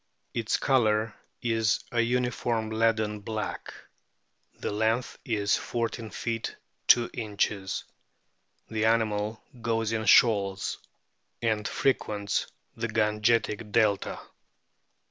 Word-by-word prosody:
Its 115 -2 0
colour 110 -5 +2 0.3
is 115 -2 +1
a 120 - +2
uniform 120 -2 0
leaden 110 -1 +1
black. 105 +1 -4 0.8
The - - -4
length 110 +4 0
is 105 -4 +1
14 115 -1 -3
feet 115 0 -3 0.3
2 120 -1 +6
inches. 100 -3 -2 0.8
The 110 -1 -1
animal 110 -1 +1 0.2
goes 115 -1 0
in 110 -1 -1
shoals, 100 -3 +4 0.6
and 110 -2 +1
frequents 105 -6 0 0.3
the 115 +1 -2
Gangetic 105 0 +1
delta. 105 -3 +2
110 Hz, 95 wpm, -28 LUFS, 105-115 Hz, 0.8 s, 2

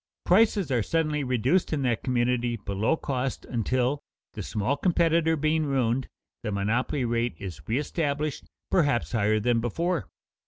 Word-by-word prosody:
Prices 195 -4 +3
are 120 -3 +2
suddenly 155 +2 0
reduced 130 - +1
in 145 -3 0
that 120 -3 +1
community 120 -1 +1
below 105 +7 0
cost 135 -3 -3
until, 125 +3 0 0.3
the - - -5
small 110 +7 -1
competitor 165 0 +2
being 155 +1 +1
ruined, 130 -2 +1 0.3
the 105 - -3
monopoly 115 +7 0
rate 120 0 0
is 95 -5 -7
reëstablished 145 +3 -1 0.3
perhaps 145 -9 +2
higher 110 -2 +2
than 115 +2 +2
before. 165 - -1
130 Hz, 140 wpm, -27 LUFS, 120-155 Hz, 0.3 s, Prices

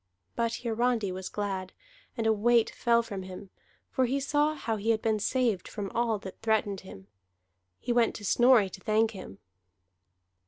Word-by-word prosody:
But 230 0 -1
Hiarandi 230 -3 0
was 185 0 -5
glad, 195 -3 -4 0.4
and 225 - -1
a 220 - +4
weight 230 +2 +3
fell 235 0 +2
from 200 -4 -6
him, 185 +1 -9 0.4
for 260 -2 +1
he 270 +3 0
saw 295 +2 +1
how 225 -6 -2
he 215 +2 -2
had 225 -1 +3
been 220 -1 +1
saved 230 -3 0
from 200 -3 -5
all 230 -2 +1
that 190 -2 -10
threatened 220 -3 +1
him. 95 - -12 0.7
He 240 - -1
went 235 -1 +2
to 205 - -7
Snorri 240 -2 +5
to 190 - -10
thank 220 +2 +2
him. 185 - -10
220 Hz, 170 wpm, -29 LUFS, 200-235 Hz, 0.7 s, Snorri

